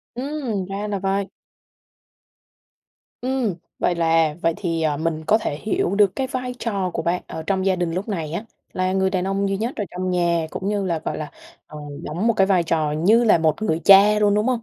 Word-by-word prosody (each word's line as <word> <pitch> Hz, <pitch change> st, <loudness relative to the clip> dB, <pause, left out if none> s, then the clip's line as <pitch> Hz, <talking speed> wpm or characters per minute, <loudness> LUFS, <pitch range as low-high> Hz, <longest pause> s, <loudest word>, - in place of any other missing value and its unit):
Ừm, 255 Hz, -7 st, -3 dB
ra 200 Hz, +2 st, -4 dB
là 205 Hz, -1 st, -2 dB
vậy. 195 Hz, +1 st, -1 dB, 1.9 s
Ừm. 255 Hz, -6 st, -1 dB, 0.2 s
Vậy 180 Hz, -, +1 dB
là 165 Hz, -2 st, +2 dB
vậy 165 Hz, 0 st, +2 dB
thì, 165 Hz, -4 st, -2 dB
ờ, 150 Hz, -2 st, +1 dB
mình 160 Hz, 0 st, -2 dB
có 215 Hz, -, +4 dB
thể 145 Hz, -9 st, -3 dB
hiểu 200 Hz, -3 st, 0 dB
được 200 Hz, -2 st, +4 dB
cái 265 Hz, -, -1 dB
vai 250 Hz, -1 st, -4 dB
trò 200 Hz, -5 st, -2 dB
của 165 Hz, -, -3 dB
bạn 175 Hz, +2 st, -1 dB
ở 160 Hz, -, -6 dB
trong 190 Hz, +3 st, -1 dB
gia 190 Hz, -1 st, +3 dB
đình 175 Hz, -2 st, -1 dB
lúc 185 Hz, +6 st, -3 dB
này 165 Hz, -7 st, -3 dB
á, 185 Hz, +6 st, -3 dB, 0.3 s
là 185 Hz, 0 st, 0 dB
người 190 Hz, 0 st, +1 dB
đàn 185 Hz, -1 st, -1 dB
ông 195 Hz, +1 st, 0 dB
duy 195 Hz, -, 0 dB
nhất 230 Hz, +5 st, -2 dB
ở 210 Hz, -, -2 dB
trong 185 Hz, +1 st, -3 dB
nhà 170 Hz, -2 st, +1 dB
cũng 195 Hz, -, -4 dB
như 205 Hz, -2 st, 0 dB
là, 170 Hz, -3 st, -1 dB
gọi -, -, -3 dB
là, 150 Hz, -1 st, -5 dB, 0.4 s
ờ, 150 Hz, -, -10 dB, 0.2 s
đóng 175 Hz, +8 st, -3 dB
một 230 Hz, -, +4 dB
cái 195 Hz, -2 st, +3 dB
vai 185 Hz, -3 st, +3 dB
trò 160 Hz, -2 st, 0 dB
như 205 Hz, +10 st, +3 dB
là 210 Hz, -, +5 dB
một 160 Hz, +4 st, +1 dB
người 165 Hz, -6 st, 0 dB
cha 205 Hz, +2 st, +7 dB
luôn, 205 Hz, -1 st, +3 dB
đúng 210 Hz, +3 st, +1 dB
không? 250 Hz, -2 st, +1 dB
190 Hz, 225 wpm, -22 LUFS, 165-210 Hz, 1.9 s, cha